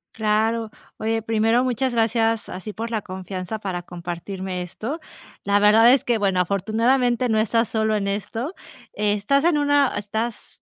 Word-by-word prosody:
Claro, 220 +1 +1 0.3
oye, 225 0 -1
primero, 225 +2 +2
muchas 255 +1 0
gracias 225 -1 +1
así 190 +4 -6
por 225 +2 -5
la 220 -2 -1
confianza 185 +2 -6
para 190 -4 -4
compartirme 180 +2 -6
esto. 225 - -5 0.4
La 200 0 +2
verdad 220 +3 +6
es 270 - +4
que 235 -2 +1
bueno, 195 -3 +1
afortunadamente 230 +6 +1
no 220 -1 +2
estás 230 +1 +1
solo 220 -1 +1
en 200 -1 -1
esto, 225 - -3 0.4
estás 210 +7 +1
en 340 -3 +3
una 285 -2 +3
estás 220 +3 -4
220 Hz, 155 wpm, -23 LUFS, 200-235 Hz, 0.4 s, verdad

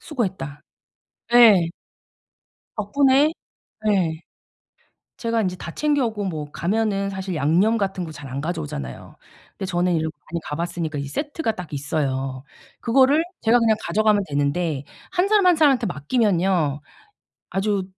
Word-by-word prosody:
"수고했다." 190 - -4 0.7
예. 210 -8 +7 1.1
덕분에 275 +7 +3 0.6
예. 175 -6 +1 1.0
제가 230 -2 0
인제 185 -1 -2
다 170 - -7
챙겨 290 -4 +1
오고 215 -2 -3
뭐 155 -6 -4
가면은 200 +1 0
사실 190 -2 -4
양념 170 +10 +3
같은 195 -2 -2
거 165 - -7
잘 145 -3 -9
안 130 +2 -4
가져오잖아요. 150 - -5 0.4
근데 190 - -3
저는 180 -1 +1
이렇게 160 -1 -2 0.2
많이 170 - -1
가 150 - -4
봤으니까 170 -3 -3
이 140 - -3
세트가 290 - -2
딱 180 -7 -9
있어요. 135 -2 -2 0.4
그거를 270 +6 +4 0.2
제가 230 +2 +5
그냥 225 -2 +3
가져가면 210 -1 +2
되는데 145 +1 -1 0.3
1 365 +2 +2
사람, 415 -3 +4
1 355 -2 +6
사람한테 275 -7 +4
맡기면요 175 - +1 0.7
아주 200 0 0
190 Hz, 285 characters per minute, -23 LUFS, 155-230 Hz, 1.1 s, 예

